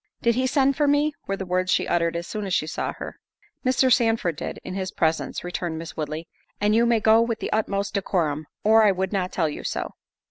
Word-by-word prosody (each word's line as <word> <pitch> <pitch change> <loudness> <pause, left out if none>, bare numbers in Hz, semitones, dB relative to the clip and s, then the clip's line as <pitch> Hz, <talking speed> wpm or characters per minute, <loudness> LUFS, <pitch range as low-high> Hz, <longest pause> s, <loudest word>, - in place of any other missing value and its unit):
"Did 235 - +4
he 255 +2 +1
send 275 0 +2
for 295 -2 +2
me?" 290 +1 +3
were 195 - -1
the 190 - -4
words 185 0 0
she - - +2
uttered 170 -1 +1
as 170 0 -3
soon 210 0 -4
as 185 - 0
she - - +1
saw 160 - -3
her. - - -8 0.4
"Mr. 255 0 +4
Sandford 225 - +2
did, - - -5
in - - -6
his 190 -1 -3
presence," 160 -3 -1
returned 175 -2 -3
Miss 165 0 -7
Woodley, 155 +1 -4 0.3
"and 210 +1 +2
you 235 +2 +4
may 235 -1 +3
go 220 +1 +5
with 230 -1 0
the - - -4
utmost 200 -2 -1
decorum, 160 -7 -1 0.2
or 220 +1 +6
I 210 - +6
would 190 +1 -2
not 185 -2 -1
tell 165 -4 +1
you 150 - -6
so." - - -3
195 Hz, 235 wpm, -24 LUFS, 170-230 Hz, 0.4 s, or